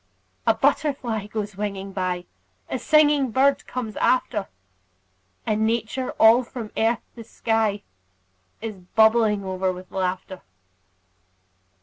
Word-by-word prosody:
A 225 Hz, -, +5 dB
butterfly 255 Hz, -4 st, 0 dB
goes 210 Hz, -1 st, -4 dB
winging 195 Hz, -1 st, -4 dB
by; 180 Hz, -2 st, -2 dB, 0.5 s
A 260 Hz, -, -1 dB
singing 295 Hz, -3 st, +4 dB
bird 270 Hz, +4 st, +2 dB
comes 230 Hz, -4 st, -5 dB
after; 220 Hz, -5 st, +1 dB, 1.0 s
And 215 Hz, 0 st, +1 dB
Nature, 235 Hz, +3 st, -1 dB
all 225 Hz, +3 st, +6 dB
from 230 Hz, -2 st, -8 dB
earth 225 Hz, 0 st, +1 dB
to 230 Hz, -, -9 dB
sky, 220 Hz, -2 st, -1 dB, 0.8 s
Is 220 Hz, -3 st, -5 dB, 0.2 s
bubbling 220 Hz, -2 st, +4 dB
o'er 185 Hz, 0 st, -1 dB
with 185 Hz, 0 st, -10 dB
laughter. 185 Hz, 0 st, -3 dB
220 Hz, 110 wpm, -24 LUFS, 200-240 Hz, 1.0 s, all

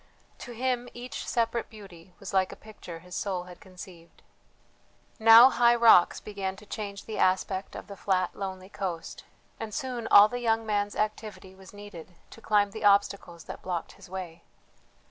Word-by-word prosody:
To 245 Hz, -, -9 dB
him 245 Hz, 0 st, -2 dB
each 245 Hz, +1 st, -7 dB
separate 235 Hz, 0 st, -1 dB
beauty 185 Hz, -5 st, -14 dB
was -, -, -8 dB
like 190 Hz, -1 st, +2 dB
a -, -, -9 dB
picture 205 Hz, -6 st, -11 dB
his 180 Hz, +1 st, -14 dB
soul 185 Hz, -3 st, -3 dB
had 180 Hz, -1 st, -13 dB
conceived. 180 Hz, -3 st, -14 dB, 1.0 s
Now 225 Hz, +3 st, +9 dB
high 240 Hz, 0 st, +4 dB
rocks 230 Hz, -7 st, +5 dB
began 195 Hz, -2 st, -5 dB
to 210 Hz, -, -15 dB
change 200 Hz, -1 st, -7 dB
the 220 Hz, -, -6 dB
aspect 190 Hz, +1 st, 0 dB
of -, -, -8 dB
the 200 Hz, -, -10 dB
flat 185 Hz, -2 st, -1 dB
lonely 190 Hz, -1 st, -6 dB
coast, 180 Hz, -5 st, -6 dB, 0.3 s
and 220 Hz, -1 st, -6 dB
soon 250 Hz, -3 st, -4 dB
all 205 Hz, +1 st, +8 dB
the 245 Hz, +3 st, -5 dB
young 225 Hz, -1 st, 0 dB
man's 205 Hz, -1 st, -1 dB
activity 215 Hz, -2 st, -4 dB
was 190 Hz, 0 st, -15 dB
needed 205 Hz, -4 st, -12 dB, 0.2 s
to 230 Hz, -, -13 dB
climb 205 Hz, -2 st, +2 dB
the 220 Hz, +1 st, -8 dB
obstacles 200 Hz, -4 st, +1 dB
that -, -, -9 dB
blocked 175 Hz, -3 st, -4 dB
his -, -, -16 dB
way. 180 Hz, -3 st, -7 dB
200 Hz, 170 wpm, -27 LUFS, 185-225 Hz, 1.0 s, Now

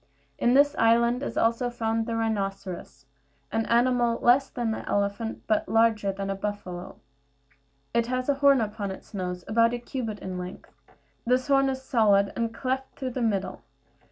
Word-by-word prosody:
In 245 Hz, +1 st, +3 dB
this 285 Hz, +1 st, +5 dB
island 235 Hz, +2 st, +3 dB
is -, -, -4 dB
also 230 Hz, +2 st, +2 dB
found 225 Hz, -1 st, -1 dB
the 230 Hz, -, -2 dB
rhinoceros, 195 Hz, -9 st, -3 dB, 0.5 s
an 225 Hz, 0 st, -1 dB
animal 240 Hz, 0 st, +2 dB
less 255 Hz, +3 st, +4 dB
than 235 Hz, -2 st, -2 dB
the 220 Hz, -, -3 dB
elephant, 205 Hz, +2 st, -1 dB
but 215 Hz, -, 0 dB
larger 225 Hz, -3 st, +3 dB
than 195 Hz, 0 st, -5 dB
the -, -, 0 dB
buffalo. 195 Hz, -3 st, -5 dB, 1.0 s
It 235 Hz, 0 st, +1 dB
has 255 Hz, 0 st, -2 dB
a 285 Hz, -, +4 dB
horn 280 Hz, -2 st, +4 dB
upon 210 Hz, -2 st, -3 dB
its 190 Hz, -, -10 dB
nose, 180 Hz, -2 st, -4 dB
about 230 Hz, +2 st, +3 dB
a -, -, -2 dB
cubit 240 Hz, -3 st, -5 dB
in 185 Hz, -2 st, -6 dB
length; 180 Hz, 0 st, -8 dB, 0.5 s
this 255 Hz, +3 st, +1 dB
horn 275 Hz, -1 st, +4 dB
is 265 Hz, 0 st, -4 dB
solid, 205 Hz, -6 st, +3 dB
and 230 Hz, -1 st, -1 dB
cleft 260 Hz, +3 st, -3 dB
through 260 Hz, -2 st, -3 dB
the 255 Hz, -, -4 dB
middle. 205 Hz, -4 st, -1 dB
225 Hz, 170 wpm, -26 LUFS, 200-250 Hz, 1.0 s, this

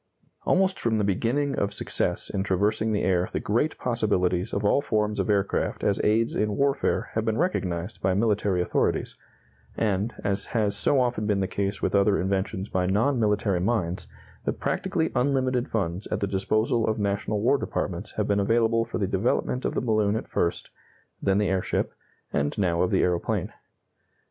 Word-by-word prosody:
Almost 190 Hz, 0 st, +2 dB
from 115 Hz, -2 st, +1 dB
the 105 Hz, -, +1 dB
beginning 120 Hz, +9 st, 0 dB
of 100 Hz, 0 st, -1 dB
success -, -, -1 dB
in 95 Hz, -, -1 dB
traversing 105 Hz, +3 st, +1 dB
the 105 Hz, -, 0 dB
air 90 Hz, -1 st, +1 dB
the -, -, 0 dB
great 120 Hz, +9 st, 0 dB
possibilities 95 Hz, -5 st, 0 dB
of 100 Hz, +1 st, -2 dB
all 140 Hz, -, +4 dB
forms 105 Hz, -4 st, 0 dB
of -, -, -1 dB
aircraft 100 Hz, -1 st, 0 dB
as 100 Hz, -2 st, +1 dB
aids 115 Hz, +2 st, +2 dB
in 105 Hz, -1 st, 0 dB
warfare 140 Hz, 0 st, +1 dB
have 110 Hz, -, 0 dB
been 110 Hz, -1 st, 0 dB
recognized 95 Hz, -, -2 dB
by 95 Hz, 0 st, +1 dB
military 100 Hz, -4 st, +1 dB
authorities, -, -, 0 dB, 0.6 s
and, 105 Hz, +1 st, 0 dB
as 100 Hz, 0 st, -1 dB
has 105 Hz, -2 st, +1 dB
so 140 Hz, -, +2 dB
often 120 Hz, -4 st, 0 dB
been 105 Hz, -2 st, +1 dB
the 95 Hz, -, +1 dB
case 100 Hz, 0 st, -3 dB
with -, -, 0 dB
other 100 Hz, 0 st, +3 dB
inventions 95 Hz, +1 st, -1 dB
by 90 Hz, -2 st, 0 dB
non 115 Hz, +8 st, +2 dB
military 105 Hz, -3 st, +1 dB
minds, 95 Hz, -4 st, -1 dB, 0.4 s
the -, -, 0 dB
practically 180 Hz, -4 st, -1 dB
unlimited 130 Hz, -1 st, +1 dB
funds 95 Hz, -3 st, -2 dB
at -, -, -2 dB
the -, -, 0 dB
disposal 110 Hz, +4 st, +1 dB
of 110 Hz, 0 st, 0 dB
national 100 Hz, 0 st, -1 dB
war 125 Hz, +6 st, +3 dB
departments 95 Hz, +2 st, -3 dB
have 105 Hz, -, -1 dB
been 100 Hz, 0 st, +2 dB
available 115 Hz, +2 st, +2 dB
for 115 Hz, -, -4 dB
the 100 Hz, -, 0 dB
development 105 Hz, +6 st, 0 dB
of -, -, -1 dB
the -, -, +1 dB
balloon 110 Hz, -3 st, +1 dB
at 110 Hz, -, -3 dB
first, 85 Hz, -, -2 dB, 0.5 s
then 95 Hz, 0 st, +2 dB
the 105 Hz, -1 st, +2 dB
airship, 95 Hz, -1 st, -1 dB, 0.4 s
and 70 Hz, 0 st, 0 dB
now 85 Hz, -4 st, +1 dB
of 90 Hz, -, +2 dB
the -, -, +2 dB
aeroplane. 90 Hz, -1 st, -1 dB
105 Hz, 180 wpm, -26 LUFS, 95-115 Hz, 0.6 s, all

